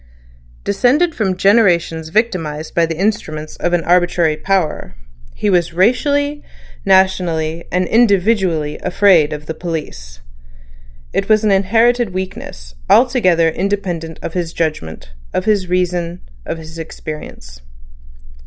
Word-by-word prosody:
Descended 260 - +2
from 190 -7 -1
generations 175 -6 +2
victimised 165 -7 -2
by 170 -1 +2
the 165 -1 -4
instruments 155 -6 -2
of 175 - -1
an 175 -1 +1
arbitrary 175 -2 +2
power, 180 - -2 0.4
he - - -2
was 175 -4 +1
racially, 285 - +1 0.4
nationally, 175 -4 +1
and 180 +1 +1
individually 195 -8 +2
afraid 175 -6 +3
of 150 0 -6
the 160 - -4
police. 150 - -6 0.9
It - - -1
was 215 0 +4
an 210 - +2
inherited 225 +2 +2
weakness, - - -7 0.2
altogether 185 -11 +4
independent 175 -3 -3
of 165 - -5
his 170 -2 -3
judgment, 80 - -4 0.2
of 185 - -1
his 205 -4 +1
reason, 180 -1 -1 0.3
of - - -3
his 160 0 -10
experience. 150 - -9
180 Hz, 120 wpm, -17 LUFS, 160-200 Hz, 0.9 s, was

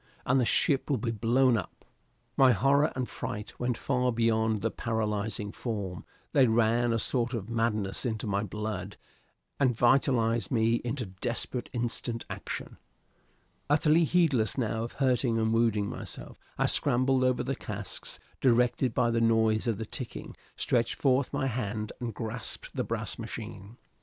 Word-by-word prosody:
and 130 +2 +3
the 125 - +2
ship 135 +4 +2
will 140 - +2
be 115 +1 -2
blown 120 +3 +3
up! 100 -6 -5 0.5
My 130 -2 +6
horror 140 +8 +3
and 130 -1 -2
fright 105 +1 -6
went 125 -1 -1
far 125 -2 +1
beyond 110 -2 +1
the 115 - +1
paralyzing 105 -2 -2
form; 100 -7 -4 0.3
they 135 -3 +5
ran 115 +1 +3
a 115 - +2
sort 120 +2 +1
of 110 0 -5
madness 110 -4 0
into 110 -4 -2
my 100 -1 0
blood 105 -1 -4 0.6
and 130 -5 +2
vitalized 120 -4 +3
me 115 0 +2
into 120 0 -2
desperate 120 +5 -4
instant 120 -1 -2
action. - - -6 0.9
Utterly 155 +3 +4
heedless 145 - +2
now 115 -2 -1
of 115 - -6
hurting 125 -3 +1
and 110 0 +1
wounding 115 -3 +2
myself, - - -7 0.2
I - - +2
scrambled 130 +1 +2
over 130 -1 +2
the 135 +2 -2
casks, 105 -2 -6 0.2
directed 125 -1 +2
by 120 - +3
the 115 0 +1
noise 110 -1 +3
of 115 -4 +1
the 110 - -4
ticking, 125 +2 -7 0.2
stretched 120 -1 0
forth 135 -1 +2
my 140 -1 -1
hand 110 -4 -2
and 120 -2 -3
grasped 110 0 -5
the - - 0
brass - - -3
machine. 100 +5 -7
115 Hz, 155 wpm, -29 LUFS, 110-125 Hz, 0.9 s, My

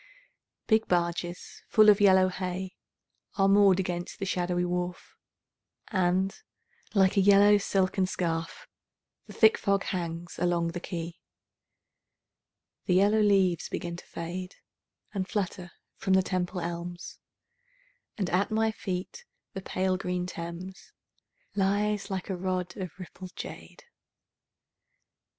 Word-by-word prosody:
Big 220 0 +3
barges 175 0 -2
full 215 -1 +5
of 210 0 +6
yellow 190 -2 +6
hay 185 0 -4 0.6
Are 195 -1 +3
moored 195 -1 +5
against 175 -2 -3
the 195 - -3
shadowy 180 -1 0
wharf, 180 0 -4 0.7
And, 185 -1 +1 0.6
like 190 0 +4
a - - +6
yellow 205 +1 +6
silken 190 -1 +1
scarf, 165 -3 -3 0.6
The - - -10
thick 220 -1 +5
fog 200 -2 +1
hangs 170 -2 -4
along 175 -1 +1
the 175 +1 -5
quay. 170 -1 -6 1.7
The 180 - +2
yellow 205 +3 +4
leaves 195 -5 +3
begin 170 0 -4
to - - -12
fade 180 +2 -6 0.6
And 190 -2 -2
flutter 180 -3 -3 0.3
from 190 -1 0
the 190 0 +5
Temple 180 0 -2
elms, 175 +1 -6 1.0
And 195 -4 -1
at 185 +3 +2
my 220 0 +1
feet 200 - -5 0.3
the 195 - -5
pale 185 0 0
green 180 -1 -2
Thames 180 +2 -8 0.6
Lies 205 +1 0
like 190 -2 -3
a - - -1
rod 180 -1 -2
of 185 -5 -6
rippled 185 0 -10
jade. - - -9
185 Hz, 125 wpm, -28 LUFS, 175-195 Hz, 1.7 s, of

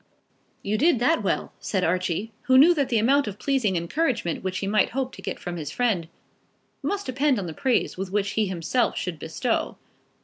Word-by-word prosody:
"You 210 +2 -1
did 325 0 +4
that 250 +8 +2
well," - - -1
said 190 -3 -1
Archie, 185 +5 -1
who 260 0 +5
knew 320 +6 +8
that 285 -5 0
the 235 - +2
amount 270 +4 +3
of 205 -1 -5
pleasing 250 -7 0
encouragement 175 - -1
which 190 0 -2
he - - -3
might 210 +2 +2
hope 260 0 -2
to - - -10
get - - -4
from 175 -1 -6
his 150 -3 -5
friend, 200 -4 0 0.7
must 405 0 -2
depend 270 +1 +1
on 195 - -3
the 165 - -5
praise 255 - 0
which 195 +1 -1
he 215 -2 +1
himself 190 +7 0
should 175 -4 -3
bestow. 165 - -2
215 Hz, 195 wpm, -25 LUFS, 185-260 Hz, 0.7 s, knew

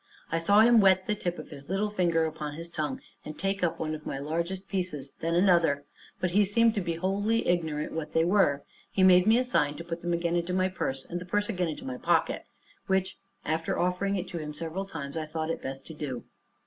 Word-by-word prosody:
I 165 - +1
saw 200 +6 +5
him 230 0 +7
wet 190 -1 +5
the 210 - +1
tip 175 -4 -3
of - - -9
his 140 0 -10
little 205 +2 0
finger 170 -5 +2
upon 150 -2 -4
his 170 +1 -8
tongue, 150 -5 -3 0.2
and 155 - -8
take 195 0 -1
up 170 -1 +1
one 155 -1 -2
of 155 -1 -6
my - - -4
largest 170 +7 -3
pieces, 175 -9 -3
and 165 +1 0
then - - +5
another; 165 -7 +3 0.3
but 180 - 0
he 205 +3 +5
seemed 225 +3 +3
to 205 - -1
be 170 -2 -2
wholly 200 +6 0
ignorant 160 -4 0
what 160 -2 -5
they 160 0 +3
were. 170 -7 +3 0.3
He 190 - +1
made 180 0 +7
me 225 +2 +6
a 250 - +3
sign 150 - +1
to - - -6
put 170 0 -5
them 175 - -2
again 170 0 0
into 175 +1 -1
my 185 0 +2
purse, 135 -7 -3
and 175 +1 -5
the - - -7
purse 205 +3 0
again 180 -5 0
into 155 - -5
my 130 -1 -4
pocket, - - +1 0.4
which, 190 0 0 0.3
after 160 +1 -1
offering 180 +3 0
it 185 -1 -3
to 170 - -4
him 150 -1 -5
several 165 +5 -4
times, 150 -7 -6
I 155 -1 -3
thought 160 +1 -2
it - - -4
best 135 0 -6
to 160 - -9
do. 140 -5 -5
170 Hz, 240 wpm, -28 LUFS, 155-190 Hz, 0.4 s, him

